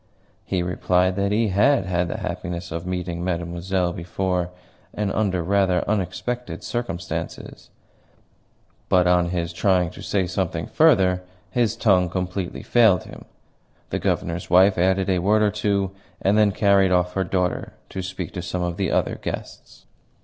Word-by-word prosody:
He 95 Hz, -2 st, -1 dB
replied 90 Hz, +1 st, +1 dB
that 100 Hz, 0 st, 0 dB
he 110 Hz, +1 st, +2 dB
HAD 105 Hz, +3 st, +3 dB
had 90 Hz, -1 st, 0 dB
the 85 Hz, -, -4 dB
happiness 85 Hz, 0 st, -5 dB
of 85 Hz, +2 st, -5 dB
meeting 90 Hz, -1 st, -3 dB
Mademoiselle 85 Hz, +1 st, -1 dB
before, 90 Hz, +1 st, -2 dB, 0.5 s
and 105 Hz, -2 st, -1 dB
under 95 Hz, -5 st, 0 dB
rather 95 Hz, -1 st, +1 dB
unexpected 110 Hz, +5 st, -3 dB
circumstances; 120 Hz, -7 st, -5 dB, 1.2 s
but 90 Hz, -1 st, +4 dB
on 90 Hz, -1 st, +3 dB
his 85 Hz, -1 st, -2 dB
trying 90 Hz, -2 st, +2 dB
to -, -, -11 dB
say 95 Hz, -2 st, 0 dB
something 90 Hz, -2 st, -2 dB
further 95 Hz, -, +3 dB, 0.3 s
his 115 Hz, -3 st, +1 dB
tongue 95 Hz, -6 st, +3 dB
completely 90 Hz, 0 st, -3 dB
failed 110 Hz, -7 st, +4 dB
him. -, -, -12 dB, 0.7 s
The -, -, -1 dB
Governor's 85 Hz, +1 st, -2 dB
wife 95 Hz, +2 st, +5 dB
added 95 Hz, +1 st, +2 dB
a 95 Hz, -2 st, +2 dB
word 105 Hz, +4 st, +3 dB
or 105 Hz, -, +3 dB
two, 100 Hz, -2 st, 0 dB, 0.3 s
and 100 Hz, +2 st, +2 dB
then 105 Hz, -1 st, +4 dB
carried 100 Hz, -1 st, +3 dB
off 90 Hz, 0 st, +2 dB
her 95 Hz, -, 0 dB
daughter 90 Hz, 0 st, -1 dB, 0.2 s
to 95 Hz, -, -5 dB
speak 90 Hz, -2 st, -6 dB
to 90 Hz, -, -4 dB
some 90 Hz, +1 st, -3 dB
of 85 Hz, 0 st, -3 dB
the 95 Hz, -3 st, 0 dB
other -, -, 0 dB
guests. -, -, -7 dB
95 Hz, 155 wpm, -23 LUFS, 90-100 Hz, 1.2 s, wife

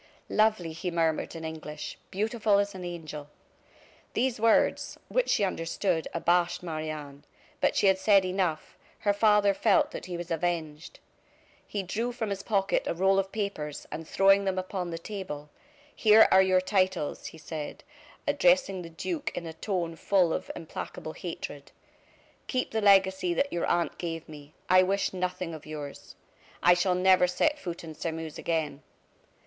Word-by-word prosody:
"Lovely!" 215 Hz, -7 st, +2 dB
he 170 Hz, +3 st, -3 dB
murmured, 165 Hz, -1 st, 0 dB
in 160 Hz, -1 st, -6 dB
English; 155 Hz, -1 st, -6 dB
"beautiful 215 Hz, +1 st, +1 dB
as 200 Hz, 0 st, 0 dB
an 185 Hz, -1 st, -7 dB
angel!" 155 Hz, -4 st, -7 dB, 0.8 s
These 250 Hz, -3 st, 0 dB
words, 225 Hz, 0 st, +2 dB
which -, -, +1 dB
she -, -, +3 dB
understood, 170 Hz, -1 st, -1 dB
abashed 175 Hz, +1 st, +1 dB
Marie 155 Hz, -2 st, -4 dB
Anne. 145 Hz, -2 st, -7 dB, 0.4 s
But -, -, +2 dB
she -, -, +2 dB
had 190 Hz, -1 st, +4 dB
said 195 Hz, -1 st, +5 dB
enough; 180 Hz, -4 st, -2 dB, 0.2 s
her 205 Hz, -, +2 dB
father 210 Hz, -1 st, +4 dB
felt 205 Hz, +1 st, +3 dB
that -, -, -7 dB
he 175 Hz, -1 st, -4 dB
was 175 Hz, 0 st, -7 dB
avenged. 165 Hz, -2 st, -3 dB, 0.7 s
He 200 Hz, -2 st, -3 dB
drew 225 Hz, +6 st, -2 dB
from 230 Hz, -4 st, -3 dB
his 195 Hz, 0 st, -3 dB
pocket 195 Hz, -2 st, 0 dB
a -, -, -1 dB
roll 190 Hz, +2 st, +3 dB
of 195 Hz, 0 st, -2 dB
papers, 200 Hz, -9 st, -4 dB
and 155 Hz, +1 st, -6 dB
throwing 195 Hz, +1 st, +4 dB
them 190 Hz, -1 st, -1 dB
upon 185 Hz, -1 st, -3 dB
the 165 Hz, -, -4 dB
table: 165 Hz, -6 st, -7 dB, 0.4 s
"Here 220 Hz, 0 st, +7 dB
are 190 Hz, -, +7 dB
your 185 Hz, -1 st, +3 dB
titles," 185 Hz, -5 st, 0 dB
he -, -, -10 dB
said, 155 Hz, -1 st, -7 dB, 0.4 s
addressing 270 Hz, -9 st, +3 dB
the 170 Hz, -, -8 dB
duke 295 Hz, -, -3 dB
in 170 Hz, -, -4 dB
a 165 Hz, -, -6 dB
tone 170 Hz, -1 st, -3 dB
full 180 Hz, -1 st, +2 dB
of -, -, -4 dB
implacable 155 Hz, 0 st, -7 dB
hatred. 145 Hz, -5 st, -7 dB, 0.8 s
"Keep 255 Hz, -1 st, -1 dB
the 220 Hz, -, 0 dB
legacy 190 Hz, -3 st, +4 dB
that 280 Hz, +7 st, 0 dB
your 170 Hz, -, -1 dB
aunt 175 Hz, -1 st, 0 dB
gave 165 Hz, -2 st, -4 dB
me, 150 Hz, 0 st, -12 dB
I 185 Hz, +1 st, +6 dB
wish 195 Hz, +2 st, 0 dB
nothing 180 Hz, -2 st, -3 dB
of 155 Hz, -1 st, -10 dB
yours. 150 Hz, -2 st, -8 dB, 0.5 s
I 180 Hz, -, +7 dB
shall 180 Hz, +1 st, +2 dB
never 185 Hz, 0 st, +5 dB
set 295 Hz, +12 st, +1 dB
foot 175 Hz, -7 st, -6 dB
in 160 Hz, -1 st, -8 dB
Sairmeuse 160 Hz, 0 st, -5 dB
again. 155 Hz, -4 st, -2 dB
180 Hz, 165 wpm, -28 LUFS, 160-200 Hz, 0.8 s, Here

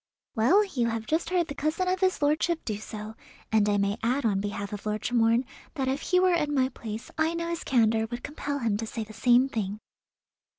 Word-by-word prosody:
"Well, 335 Hz, -, +4 dB
you 250 Hz, -11 st, -1 dB
have 225 Hz, -1 st, -2 dB
just 325 Hz, +4 st, 0 dB
heard 355 Hz, -2 st, +1 dB
the 285 Hz, -, -5 dB
cousin 310 Hz, +6 st, -1 dB
of 370 Hz, 0 st, +1 dB
his 370 Hz, -4 st, +1 dB
lordship 315 Hz, +3 st, +1 dB
do 215 Hz, -3 st, -2 dB
so, 215 Hz, 0 st, -7 dB, 0.4 s
and 210 Hz, -1 st, +3 dB
I 205 Hz, -, +2 dB
may 200 Hz, +1 st, 0 dB
add 245 Hz, +4 st, 0 dB
on 200 Hz, -3 st, +2 dB
behalf 205 Hz, 0 st, -4 dB
of 205 Hz, +1 st, -6 dB
Lord 210 Hz, 0 st, -2 dB
Tremorne 235 Hz, +1 st, +2 dB, 0.3 s
that 270 Hz, -3 st, -1 dB
if 270 Hz, +2 st, -1 dB
he 360 Hz, -, +2 dB
were 370 Hz, -1 st, +4 dB
in 300 Hz, -4 st, +1 dB
my 260 Hz, -1 st, +3 dB
place 225 Hz, -3 st, -7 dB
I 320 Hz, +1 st, +2 dB
know 335 Hz, 0 st, -2 dB
his 340 Hz, -1 st, -3 dB
candour 225 Hz, -3 st, +2 dB
would 240 Hz, +1 st, -6 dB
compel 290 Hz, -1 st, -4 dB
him 225 Hz, -6 st, 0 dB
to 225 Hz, +1 st, -4 dB
say 225 Hz, 0 st, -4 dB
the 215 Hz, 0 st, -12 dB
same 245 Hz, +4 st, +4 dB
thing." 210 Hz, -5 st, -3 dB
245 Hz, 225 wpm, -27 LUFS, 220-310 Hz, 0.4 s, Well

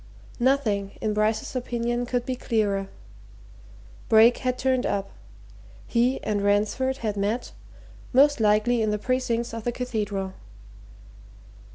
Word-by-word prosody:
Nothing, 225 Hz, -7 st, +1 dB
in 215 Hz, -1 st, -1 dB
Bryce's 215 Hz, +3 st, 0 dB
opinion, 240 Hz, -1 st, -2 dB
could 245 Hz, 0 st, -1 dB
be 260 Hz, -, -2 dB
clearer. 205 Hz, -6 st, -1 dB, 1.2 s
Brake 225 Hz, +2 st, +6 dB
had 255 Hz, -1 st, -1 dB
turned 260 Hz, -1 st, +1 dB
up. 195 Hz, -1 st, -2 dB, 0.7 s
He 245 Hz, +2 st, +1 dB
and 205 Hz, -1 st, -1 dB
Ransford 210 Hz, +6 st, +1 dB
had 210 Hz, -1 st, -1 dB
met 205 Hz, +5 st, -2 dB, 0.6 s
most 285 Hz, +2 st, +5 dB
likely 215 Hz, +2 st, +3 dB
in 215 Hz, -, +1 dB
the 210 Hz, -, 0 dB
precincts 240 Hz, 0 st, -1 dB
of 230 Hz, -1 st, -5 dB
the 240 Hz, -, -1 dB
Cathedral. 210 Hz, -6 st, -3 dB
230 Hz, 125 wpm, -25 LUFS, 210-250 Hz, 1.2 s, Brake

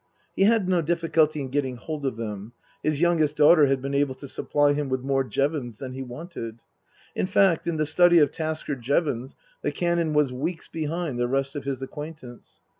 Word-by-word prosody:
He 195 Hz, -, +4 dB
had 220 Hz, -3 st, +3 dB
no 180 Hz, -2 st, +2 dB
difficulty 160 Hz, -2 st, +1 dB
in 135 Hz, -, -5 dB
getting 130 Hz, -2 st, -1 dB
hold 150 Hz, +2 st, -4 dB
of 130 Hz, -, -2 dB
them; 105 Hz, 0 st, -6 dB, 0.3 s
his 155 Hz, 0 st, 0 dB
youngest 165 Hz, -4 st, +2 dB
daughter 150 Hz, 0 st, +6 dB
had 135 Hz, -1 st, 0 dB
been 140 Hz, 0 st, -3 dB
able 140 Hz, -1 st, +1 dB
to 140 Hz, -, -10 dB
supply 145 Hz, +2 st, +1 dB
him 145 Hz, -1 st, -2 dB
with 130 Hz, -1 st, -1 dB
more 135 Hz, 0 st, +1 dB
Jevons 135 Hz, -4 st, -2 dB
than 130 Hz, +1 st, -7 dB
he 135 Hz, -, -6 dB
wanted. 125 Hz, -4 st, -7 dB, 0.5 s
In -, -, -1 dB
fact, 185 Hz, -4 st, +3 dB
in 170 Hz, -, 0 dB
the 155 Hz, -1 st, 0 dB
study 175 Hz, +3 st, +5 dB
of 150 Hz, -3 st, +5 dB
Tasker 155 Hz, -2 st, -2 dB
Jevons 130 Hz, 0 st, -1 dB, 0.3 s
the -, -, -1 dB
Canon 170 Hz, -2 st, 0 dB
was 150 Hz, -4 st, +2 dB
weeks 160 Hz, +6 st, -4 dB
behind 160 Hz, -4 st, -3 dB
the 120 Hz, -, +1 dB
rest 135 Hz, +2 st, -1 dB
of 140 Hz, -2 st, -5 dB
his 135 Hz, -1 st, -3 dB
acquaintance. 150 Hz, -3 st, -9 dB
145 Hz, 195 wpm, -25 LUFS, 130-160 Hz, 0.5 s, daughter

